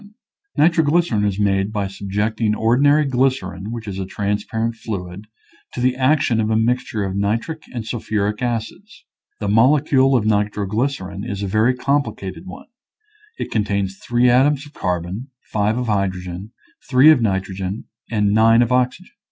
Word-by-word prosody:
Nitroglycerin 160 -7 +3
is 100 -2 0
made 100 0 +1
by 105 -2 -2
subjecting 105 +3 -1
or 115 +2 +2
dinary 145 +2 +4
glycerin, 125 -7 -1
which 115 -2 -6
is 95 -1 -5
a 95 - -3
transparent 105 +3 -2
fluid, 100 -3 -7 0.5
to - - -5
the 125 +1 +2
action 130 -3 +2
of 110 - -1
a 110 - +1
mixture 115 -1 0
of 95 -1 -3
nitric 115 +11 -2
and 120 -3 -5
sul 120 +1 -4
phuric 105 0 -2
acids. 125 - -5 0.3
The 105 - -3
molecule 135 +4 +4
of 110 - -1
nitroglycerin 105 0 -1
is 100 -4 -4
a - - -1
very 110 +6 +2
complicated 125 - -2
one; - - -10 0.7
it - - -5
contains 100 -3 -1
three 120 +1 +1
atoms 135 +4 +3
of 145 - -15
carbon, 90 - -3 0.2
five 105 +2 +1
of 125 - -2
hydrogen, 95 -2 -3 0.4
three 135 +4 +7
of 145 -6 +3
nitrogen, 95 -1 -2 0.3
and 105 -2 +1
nine 115 +2 +5
of 120 - -3
oxygen. 125 - 0
110 Hz, 155 wpm, -20 LUFS, 100-125 Hz, 0.7 s, three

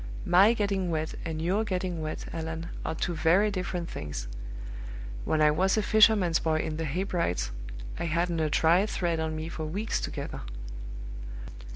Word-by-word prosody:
My 195 +6 +7
getting 200 -4 0
wet, 160 -1 -1
and 160 -1 -3
your 185 +7 +1
getting 180 -4 -2
wet, 155 0 -4
Allan, 165 +1 -4
are - - -2
two 175 - -1
very 170 +7 +4
different 180 -2 -2
things. 70 - -5 1.0
When 155 -1 +3
I 150 - +6
was 190 +7 +2
a 215 - +2
fisherman's 205 -6 +5
boy 160 -1 +1
in 155 - -3
the 165 - -1
Hebrides, 170 - 0 0.5
I - - -1
hadn't 170 +1 +1
a 155 -1 +2
dry 165 +5 +5
thread 170 -5 0
on 160 0 -1
me 155 +1 -3
for 160 -1 -4
weeks 205 +8 -1
together." - - -4
170 Hz, 165 wpm, -29 LUFS, 160-190 Hz, 1.0 s, My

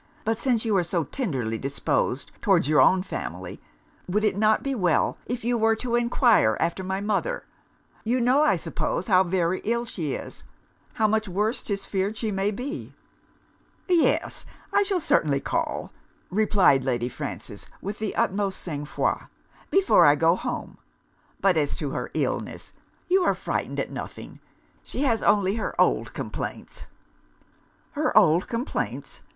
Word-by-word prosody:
'But 225 +1 0
since 240 -3 +1
you 215 -3 +1
are 180 - +2
so 170 0 0
tenderly 130 - -3
disposed 135 -1 -1
towards 185 -8 +3
your 150 0 +5
own 185 0 +4
family, - - -6 0.5
would 210 +4 0
it 210 -3 +2
not 215 +1 +3
be 275 - -1
well 180 - +1
if 245 0 -3
you 240 -1 +1
were 225 0 +3
to 235 +1 -4
enquire 235 - +3
after 170 +3 -1
my 190 +1 -2
mother? 205 -1 -1 0.6
You 240 +3 +1
know, 250 +4 +4
I 305 - +4
suppose, - - -2
how 185 -4 +5
very 180 0 0
ill 235 +2 0
she 160 - -3
is; - - -8 0.5
how 220 - +1
much 220 0 +1
worse 210 +6 -1
'tis 195 -2 -3
feared 195 +2 -2
she 220 -1 -1
may 195 +1 0
be?' 255 +9 -6 0.9
'Yes, 350 -3 +2 0.3
I - - +5
shall 395 -2 +1
certainly 145 - +2
call,' - - -2 0.4
replied 195 -9 +4
Lady 120 -2 0
Frances 125 - -7
with 200 +2 -6
the 215 -2 -3
utmost 195 0 0
sang 145 -4 -5
froid, - - -1 0.4
'before 390 - +5
I 145 - +6
go 165 +3 +3
home. - - -5 0.6
But 190 -4 +3
as 145 -2 +1
to 145 -3 -3
her - - -4
illness, - - -2 0.3
you 375 +1 +4
are - - +2
frightened - - -3
at - - -3
nothing: - - -8 0.4
she 270 - -4
has 230 -5 +2
only 200 0 +3
her 220 - -4
old - - +2
complaints.' - - -6 1.0
'Her 300 -4 0
old 175 -3 +5
complaints! 240 +4 -4
205 Hz, 155 wpm, -25 LUFS, 170-235 Hz, 1.0 s, I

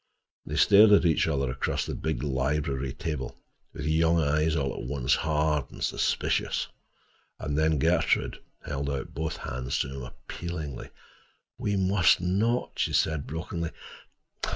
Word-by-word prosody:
They 75 - -3
stared 105 +6 +7
at 100 - +5
each 80 -1 +3
other 70 -4 0
across 65 - -1
the - - -4
big 80 -1 -2
library 70 0 -1
table, 75 -4 -4 0.3
with 75 - -6
young 80 +2 +3
eyes 75 +1 +2
all 70 -4 0
at - - -6
once 70 -4 +1
hard, 75 -2 +1 0.2
suspicious. - - 0 0.7
And 75 - -3
then 80 0 +2
Gertrude 65 - +1 0.3
held 70 0 -3
out 70 -1 -4
both 80 +2 -3
hands 65 +1 -3
to 65 - -1
him 70 - -6
appealingly. 75 +2 -6 0.7
"We 105 - 0
must 95 0 +4
not," 105 +7 0
she - - +1
said 80 -3 +1
brokenly. 85 +1 -4
75 Hz, 140 wpm, -28 LUFS, 70-85 Hz, 0.7 s, stared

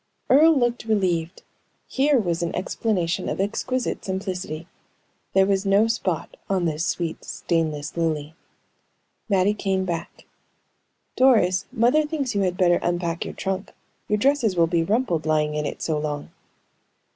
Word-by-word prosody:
'" - - -46
Earle 310 +3 +6
looked 240 -2 0
relieved. 180 -6 0 0.4
Here 280 +1 +2
was 175 -7 0
an 170 - -2
explanation 180 -2 -1
of - - -3
exquisite 240 +5 -2
simplicity. 185 -4 -4 0.7
There 195 0 +5
was 195 0 +1
no 200 +2 +4
spot 190 -8 -2
on 190 -3 +1
this 160 +1 -1
sweet, 170 -2 -3
stainless 155 -4 -2
lily. 160 -2 -1 1.0
Mattie 195 0 +3
came 190 -2 -1
back. 170 -2 -5 0.9
"Doris, 200 -8 +4
mother 245 +7 +3
thinks 295 -5 -2
you 200 - +1
had 180 -2 0
better 175 -1 +4
unpack 175 -1 -1
your - - -7
trunk. 190 0 -3 0.3
Your 210 - +1
dresses 255 -4 +2
will 170 -1 +4
be 165 0 +1
rumpled 180 -5 0
lying 150 -1 +1
in 150 -1 -1
it - - -6
so 155 -2 0
long." 150 -1 -4
185 Hz, 145 wpm, -24 LUFS, 165-220 Hz, 1.0 s, Earle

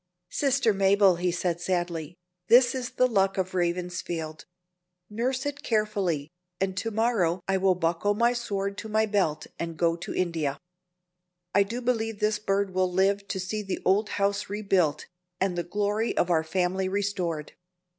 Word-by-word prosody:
"Sister 270 -5 +2
Mabel," 195 -1 +4
he 180 0 0
said, 175 -1 -1
sadly, 175 -3 -2 0.3
"this 240 +2 +6
is 255 -2 -3
the 255 - +3
luck 195 -5 +2
of 185 0 -1
Ravensfield: 175 -3 -2 0.7
nurse 255 +5 -1
it 285 0 -3
carefully, 200 - 0 0.3
and 190 -1 -1
to 225 - -1
morrow 215 -6 +1
I 195 0 +2
will 190 -1 +3
buckle 175 +4 0
my 235 +3 +3
sword 200 -4 -3
to 220 - -7
my 220 +1 +2
belt 190 -8 0
and 165 -1 -4
go 165 0 +2
to 170 - -7
India. 160 -6 -1 1.0
I 200 - +5
do 230 +5 -2
believe 225 -3 -1
this 210 0 +1
bird 195 -1 0
will 185 0 +1
live 195 +2 +1
to 195 - -3
see 190 +4 -3
the 195 -2 -4
old 205 +3 +3
house 200 0 0
rebuilt, 195 -7 +1 0.3
and 190 -2 0
the 175 - 0
glory 205 +5 -1
of 175 - +2
our 160 -2 +3
family 185 +3 0
restored." 190 -6 -2
195 Hz, 165 wpm, -27 LUFS, 175-215 Hz, 1.0 s, this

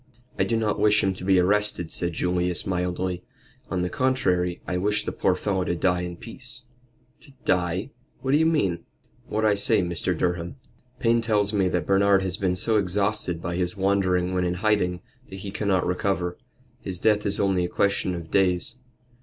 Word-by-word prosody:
"I - - +3
do 115 - 0
not 110 -2 0
wish 105 0 +4
him 95 - +1
to 90 - -8
be 95 0 +4
arrested," 100 -2 +1
said 85 -1 -2
Julius, 90 +1 -1
mildly. 90 0 -2 0.5
"On 90 -1 -1
the - - 0
contrary, 90 -9 0
I 90 - -1
wish 105 +3 +1
the - - -2
poor 95 - +1
fellow 95 0 -1
to 85 - -1
die 90 0 +1
in 90 -1 -5
peace." 120 +3 -9 0.6
"To 145 - -15
die 90 +7 0 0.3
what 130 +1 -1
do 145 - +5
you 160 +1 +3
mean?" 120 - +1 0.4
"What 110 +1 -1
I 105 - +4
say, 100 -1 +3
Mr. 85 0 -1
Durham. 85 +2 -1 0.4
Payne 115 -1 +2
tells 105 -2 +1
me 95 -3 +2
that 90 -3 -1
Bernard 100 0 +4
has 95 -1 -1
been 95 -2 0
so 110 +4 +2
exhausted 100 -2 0
by 85 0 -2
his 90 +2 -1
wandering 95 -2 +1
when 90 -1 +1
in 90 0 0
hiding, 90 -3 +1 0.3
that 95 - -8
he 100 - -6
cannot 100 -3 0
recover. 90 -1 -1 0.5
His 95 -2 -4
death 105 +2 +2
is 100 - 0
only 95 -2 +2
a 90 - -2
question 100 -2 0
of 85 -2 -8
days. 95 +4 +1
95 Hz, 190 wpm, -25 LUFS, 90-105 Hz, 0.6 s, do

